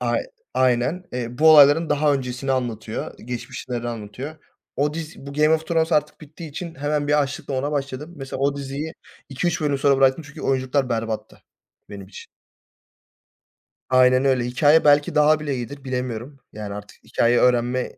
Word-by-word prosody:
Ay -, -, 0 dB, 0.3 s
aynen 130 Hz, +7 st, +1 dB, 0.3 s
bu 160 Hz, +1 st, +7 dB
olayların 150 Hz, +2 st, +7 dB
daha 150 Hz, 0 st, +3 dB
öncesini 130 Hz, 0 st, -3 dB
anlatıyor. 115 Hz, -4 st, -4 dB
Geçmişleri 120 Hz, 0 st, -5 dB
anlatıyor. 120 Hz, +7 st, -7 dB, 0.4 s
O 145 Hz, +2 st, 0 dB
diz 160 Hz, -3 st, -7 dB
bu 140 Hz, -, -7 dB
Game 150 Hz, +2 st, +3 dB
of 160 Hz, 0 st, -3 dB
Thrones 165 Hz, 0 st, +1 dB
artık 150 Hz, +1 st, 0 dB
bittiği 155 Hz, +1 st, -10 dB
için 165 Hz, +3 st, -7 dB
hemen 145 Hz, 0 st, -2 dB
bir 150 Hz, 0 st, +4 dB
açlıkla 140 Hz, +1 st, -5 dB
ona 145 Hz, +3 st, -2 dB
başladım. 140 Hz, +3 st, -4 dB
Mesela 135 Hz, -1 st, -6 dB
o 140 Hz, +1 st, +1 dB
diziyi 140 Hz, +4 st, -5 dB, 0.3 s
2-3 170 Hz, +6 st, -1 dB
bölüm 145 Hz, -3 st, 0 dB
sonra 140 Hz, 0 st, +3 dB
bıraktım. 135 Hz, +4 st, +3 dB
Çünkü 140 Hz, -, -11 dB
oyuncular 130 Hz, 0 st, 0 dB
berbattı 115 Hz, -2 st, -4 dB, 0.5 s
benim 100 Hz, -2 st, -9 dB
için. 95 Hz, -, -11 dB, 1.6 s
Aynen 130 Hz, +1 st, +4 dB
öyle 130 Hz, -2 st, +2 dB
hikâye 145 Hz, +6 st, +4 dB
belki 145 Hz, 0 st, +4 dB
daha 150 Hz, +1 st, +4 dB
bile 145 Hz, -3 st, -3 dB
iyidir 135 Hz, +3 st, -7 dB
bilemiyorum. 125 Hz, +1 st, -4 dB, 0.2 s
Yani 105 Hz, -1 st, -6 dB
artık 105 Hz, 0 st, -11 dB
hikâye 120 Hz, +1 st, +2 dB
öğrenme 125 Hz, 0 st, +1 dB
140 Hz, 155 wpm, -22 LUFS, 125-150 Hz, 1.6 s, bu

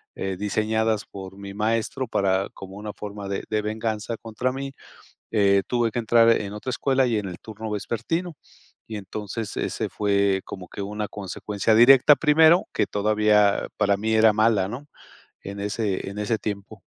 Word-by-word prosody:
eh, 95 Hz, 0 st, -3 dB
diseñadas 110 Hz, +2 st, 0 dB
por 95 Hz, 0 st, -10 dB
mi 100 Hz, 0 st, -8 dB
maestro 115 Hz, +4 st, -1 dB
para 95 Hz, -2 st, +1 dB
como 95 Hz, 0 st, -10 dB
una 105 Hz, 0 st, -6 dB
forma 105 Hz, -1 st, -7 dB
de 100 Hz, -, -3 dB
de 110 Hz, -1 st, 0 dB
venganza 110 Hz, +1 st, -3 dB
contra 115 Hz, +3 st, -3 dB
mí, 135 Hz, +1 st, -5 dB, 0.6 s
eh, 100 Hz, -2 st, +4 dB
tuve 120 Hz, -2 st, +1 dB
que 120 Hz, -, -2 dB
entrar 115 Hz, 0 st, +4 dB
en 105 Hz, -3 st, +1 dB
otra 105 Hz, +5 st, -6 dB
escuela 130 Hz, +1 st, +1 dB
y 115 Hz, -3 st, +1 dB
en 105 Hz, -, -3 dB
el 90 Hz, -2 st, -7 dB
turno 110 Hz, 0 st, -8 dB
vespertino. 140 Hz, -, -3 dB, 0.5 s
Y 110 Hz, -, -5 dB
entonces, 105 Hz, +2 st, -6 dB
ese -, -, -2 dB
fue 100 Hz, -2 st, +1 dB
como 90 Hz, -1 st, -8 dB
que 100 Hz, -, -8 dB
una 105 Hz, +1 st, -4 dB
consecuencia 105 Hz, +2 st, -2 dB
directa 130 Hz, +5 st, +7 dB
primero, 160 Hz, +3 st, +5 dB
que -, -, +1 dB
todavía 105 Hz, 0 st, +2 dB
para 100 Hz, -1 st, +3 dB
mí 110 Hz, +2 st, -2 dB
era 110 Hz, 0 st, +5 dB
mala, 110 Hz, -3 st, +3 dB
¿no?, 130 Hz, +7 st, -7 dB, 0.6 s
en 100 Hz, +1 st, -7 dB
ese 100 Hz, -2 st, -2 dB
en 100 Hz, -, -9 dB
ese 105 Hz, +2 st, 0 dB
tiempo. 100 Hz, -2 st, -6 dB
105 Hz, 170 wpm, -24 LUFS, 100-115 Hz, 0.6 s, directa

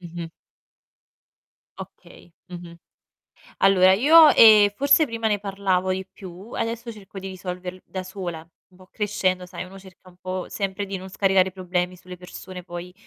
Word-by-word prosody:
Mh-mh. 170 Hz, -1 st, -8 dB, 1.5 s
Okay, 175 Hz, -, -13 dB, 0.2 s
mh-mh. 175 Hz, -1 st, -10 dB, 0.8 s
Allora, 190 Hz, -1 st, +5 dB
io, 305 Hz, +9 st, +7 dB
ehm, 210 Hz, -2 st, +7 dB
forse 285 Hz, +5 st, +4 dB
prima 230 Hz, -3 st, -3 dB
ne 210 Hz, -2 st, 0 dB
parlavo 195 Hz, -2 st, -1 dB
di 190 Hz, 0 st, -3 dB
più, 190 Hz, +4 st, -12 dB
adesso 230 Hz, +1 st, -4 dB
cerco 200 Hz, -2 st, -13 dB
di 195 Hz, -, -7 dB
risolverl 180 Hz, 0 st, -7 dB
da 185 Hz, -1 st, -6 dB
sola. 180 Hz, -4 st, -7 dB, 0.2 s
Un 180 Hz, -, -22 dB
po' 185 Hz, 0 st, -18 dB
crescendo, 185 Hz, -3 st, -1 dB
sai, 180 Hz, 0 st, -8 dB
uno 190 Hz, +1 st, -13 dB
cerca 185 Hz, -1 st, -18 dB
un 180 Hz, -, -20 dB
po' 185 Hz, 0 st, -5 dB
sempre 200 Hz, 0 st, -4 dB
di 195 Hz, 0 st, -6 dB
non 190 Hz, 0 st, -8 dB
scaricare 190 Hz, -1 st, +2 dB
problemi 180 Hz, -1 st, -3 dB
sulle 180 Hz, 0 st, -11 dB
persone 180 Hz, 0 st, -10 dB
poi 175 Hz, 0 st, -9 dB
185 Hz, 155 wpm, -23 LUFS, 180-200 Hz, 1.5 s, io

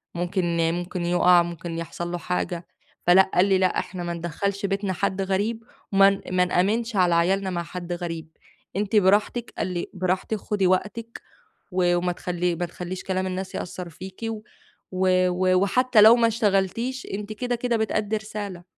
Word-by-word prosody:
ممكن 175 Hz, 0 st, -1 dB, 0.2 s
ممكن 175 Hz, 0 st, -3 dB
يُقع 175 Hz, 0 st, +5 dB
ممكن 170 Hz, 0 st, -6 dB
يحصل 175 Hz, +1 st, -5 dB
له 175 Hz, -, -2 dB
حاجة،" 175 Hz, 0 st, -3 dB, 0.4 s
فلأ 190 Hz, +2 st, +6 dB
قال 180 Hz, -, +5 dB
لي: 195 Hz, -1 st, +3 dB
"لأ 185 Hz, -1 st, +2 dB
إحنا 180 Hz, -2 st, -5 dB
ما 175 Hz, 0 st, -3 dB
ندخّلش 180 Hz, +4 st, -3 dB
بيتنا 195 Hz, 0 st, -1 dB
حد 190 Hz, +2 st, -1 dB
غريب 205 Hz, +4 st, -1 dB, 0.3 s
وما 195 Hz, 0 st, +5 dB
ما 180 Hz, 0 st, +3 dB
نآمنش 215 Hz, +6 st, 0 dB
على 175 Hz, -2 st, +4 dB
عيالنا 190 Hz, +3 st, +2 dB
مع 175 Hz, -1 st, -2 dB
حد 175 Hz, 0 st, -6 dB
غريب، 165 Hz, -2 st, -5 dB, 0.5 s
أنتِ 205 Hz, +2 st, -1 dB
براحتِك." 210 Hz, +4 st, +2 dB
قال -, -, -1 dB
لي: 180 Hz, -2 st, -3 dB
"براحتِك 185 Hz, +3 st, -1 dB
خدي 200 Hz, -1 st, 0 dB
وقتِك 210 Hz, +5 st, -1 dB, 0.5 s
و 180 Hz, -1 st, +2 dB
وما 180 Hz, 0 st, 0 dB
تخلّي 175 Hz, 0 st, -2 dB
ما 175 Hz, +1 st, -2 dB
تخلّيش 180 Hz, +2 st, -6 dB
كلام 190 Hz, 0 st, -1 dB
الناس 185 Hz, +1 st, -4 dB
يأثّر 180 Hz, 0 st, -5 dB
فيكِ، 185 Hz, +5 st, -11 dB
و 225 Hz, -1 st, -3 dB, 0.9 s
و 185 Hz, +1 st, +2 dB
وحتّى 250 Hz, +3 st, +4 dB
لو 220 Hz, +2 st, +9 dB
ما 235 Hz, -1 st, +3 dB
اشتغلتيش 230 Hz, +3 st, 0 dB
أنتِ 210 Hz, +2 st, -4 dB
كده، 245 Hz, +2 st, -2 dB
كده 240 Hz, 0 st, 0 dB
بتأدي 220 Hz, -1 st, 0 dB
رسالة." 205 Hz, -4 st, -6 dB
185 Hz, 165 wpm, -24 LUFS, 175-210 Hz, 0.9 s, لو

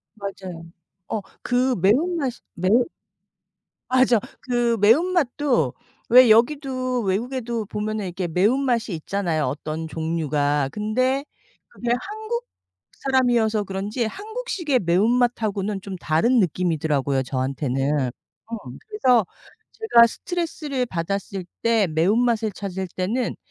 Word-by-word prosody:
맞아요. 190 Hz, -4 st, -7 dB, 0.5 s
어 215 Hz, -, -2 dB, 0.2 s
그 250 Hz, +1 st, +1 dB
매운 305 Hz, -, +3 dB
맛이 260 Hz, -5 st, -3 dB
매운 205 Hz, +8 st, +3 dB, 1.0 s
맞아. 255 Hz, -2 st, +4 dB, 0.2 s
그 240 Hz, -2 st, +1 dB
매운맛도 270 Hz, -, +3 dB, 0.3 s
왜 245 Hz, -1 st, +8 dB
여기도 255 Hz, 0 st, +2 dB
외국에도 230 Hz, +2 st, -2 dB
보면은 210 Hz, -1 st, -3 dB
이렇게 180 Hz, +1 st, -3 dB
매운 205 Hz, +11 st, +2 dB
맛이 235 Hz, -5 st, 0 dB
있잖아요, 165 Hz, -1 st, -1 dB
어떤 155 Hz, +4 st, -3 dB
종류가. 150 Hz, -3 st, 0 dB
근데 255 Hz, -, 0 dB, 0.4 s
그게 240 Hz, -, -5 dB, 0.2 s
한국 440 Hz, +3 st, -4 dB, 0.5 s
사람이어서 240 Hz, -5 st, +1 dB
그런지 200 Hz, +5 st, -3 dB
한국식의 400 Hz, -, -2 dB
매운맛하고는 210 Hz, +1 st, +1 dB
좀 195 Hz, -1 st, -6 dB
다른 185 Hz, +10 st, +2 dB
느낌이더라고요, 155 Hz, -6 st, 0 dB
저한테는. 135 Hz, +1 st, -1 dB, 0.4 s
어 230 Hz, -, -4 dB, 0.3 s
그래서 255 Hz, -, +3 dB, 0.5 s
제가 425 Hz, -, +5 dB
스트레스를 300 Hz, -3 st, -3 dB
받았을 190 Hz, +1 st, -3 dB, 0.2 s
때 230 Hz, -4 st, +3 dB
매운맛을 215 Hz, +7 st, +2 dB
찾을 190 Hz, -1 st, -5 dB
때는 225 Hz, +7 st, -1 dB
220 Hz, 270 characters per minute, -23 LUFS, 180-255 Hz, 1.0 s, 왜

